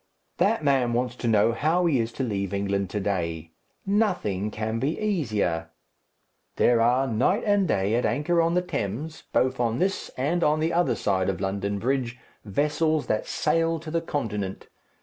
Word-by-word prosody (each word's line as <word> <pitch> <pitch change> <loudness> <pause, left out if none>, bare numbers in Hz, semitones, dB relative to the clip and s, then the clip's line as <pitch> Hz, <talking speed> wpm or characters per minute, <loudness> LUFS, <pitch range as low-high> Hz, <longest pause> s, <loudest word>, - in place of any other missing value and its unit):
"That 210 -4 +2
man 135 -4 +2
wants 125 0 -1
to 120 - -3
know 110 0 +4
how 160 +9 +1
he 150 -7 +3
is 115 0 -1
to 135 - -3
leave 100 -4 -2
England 100 -1 -1
to 105 - -2
day. 85 -5 -2 0.3
Nothing 180 - 0
can 110 +1 -3
be 140 +6 -1
easier. 110 - -1 0.9
There 120 -1 +4
are 125 +3 +3
night 130 - +1
and 205 -2 +3
day 100 -4 +1
at 120 +2 +2
anchor 150 +7 +1
on 165 +1 +1
the 180 - +2
Thames, 145 - -4
both 130 0 +1
on 115 -1 +1
this 195 +6 -1
and 160 +7 0
on 150 +1 +3
the 160 +2 0
other 175 +1 +2
side 95 -2 0
of 95 - -2
London 100 +1 -2
Bridge, 125 +1 -1 0.3
vessels 150 +7 0
that 110 - -1
sail 165 0 +1
to 160 -1 -7
the 165 +1 0
Continent. 105 - -4
125 Hz, 175 wpm, -26 LUFS, 100-160 Hz, 0.9 s, know